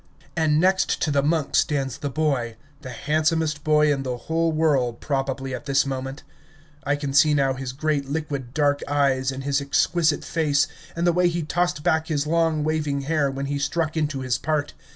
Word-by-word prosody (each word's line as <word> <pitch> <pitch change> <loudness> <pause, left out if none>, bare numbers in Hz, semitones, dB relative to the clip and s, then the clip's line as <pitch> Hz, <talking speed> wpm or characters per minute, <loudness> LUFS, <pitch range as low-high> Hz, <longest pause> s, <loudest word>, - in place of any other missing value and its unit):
And 155 -2 +2
next 190 +2 +2
to 155 - +1
the 140 -1 +3
monk 155 0 0
stands 135 -4 +1
the 145 - -3
boy, 130 -6 -1 0.2
the 130 - -8
handsomest 155 +3 0
boy 150 -1 +4
in 135 - -3
the 125 -2 -3
whole 165 +5 0
world 145 -7 +1
probably 135 -1 -2
at 145 - -6
this 140 0 +3
moment. 135 +1 -5 0.6
I 145 +1 +1
can 145 -1 -4
see 150 +2 +5
now 135 -2 +2
his 130 -1 -5
great, 140 0 -1
liquid, 140 -4 -4
dark 145 0 +1
eyes, 135 -2 +1
and 135 0 -6
his 140 0 0
exquisite 155 +2 +1
face, 145 -4 +1 0.3
and 170 +1 -1
the 175 - +4
way 180 +1 +3
he 170 -1 -2
tossed 175 -1 -1
back 160 -2 +1
his 145 -3 -1
long 160 -1 +1
waving 150 -2 -1
hair 145 0 +1
when 135 +1 -4
he 140 0 -2
struck 155 +3 -1
into 150 -4 -1
his 130 -2 -1
part. 150 -1 -1
145 Hz, 195 wpm, -24 LUFS, 135-155 Hz, 0.6 s, see